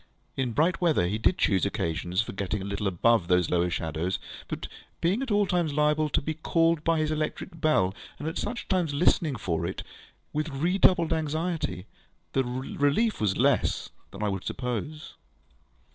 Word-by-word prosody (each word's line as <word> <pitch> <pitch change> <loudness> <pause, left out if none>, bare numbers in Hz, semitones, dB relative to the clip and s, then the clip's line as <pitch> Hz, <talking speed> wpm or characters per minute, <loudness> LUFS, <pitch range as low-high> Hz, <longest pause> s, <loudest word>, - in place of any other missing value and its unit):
In 125 -3 -1
bright 165 +8 +2
weather, 160 - +3
he 100 +5 -1
did 175 - +2
choose 95 -4 +2
occasions 85 +4 -1
for - - -7
getting 100 +1 -2
a 95 - -5
little 100 0 -2
above 95 +1 +3
these 90 -1 +2
lower 90 0 +2
shadows; 80 +3 -2 0.3
but, - - -4 0.3
being 190 +9 +1
at 270 - -3
all 205 -1 +3
times 175 -5 0
liable 150 +1 +2
to - - +1
be 155 - -2
called 165 0 +1
by 165 0 +2
his 155 0 0
electric 155 +2 -3
bell, 95 -12 +3 0.2
and 150 - -5
at 160 - -3
such 240 +3 -4
times 175 -6 0
listening 155 -2 +2
for 85 -7 -2
it 90 +2 -3 0.5
with 155 +1 -1
redoubled 170 +3 +3
anxiety, 155 - -2 0.5
the 135 - +2
relief 140 - 0
was 100 -3 +1
less - - +1 0.2
than - - -7
I 105 - +1
would 95 -2 -3
suppose. 125 +5 -4
145 Hz, 175 wpm, -27 LUFS, 100-165 Hz, 0.5 s, weather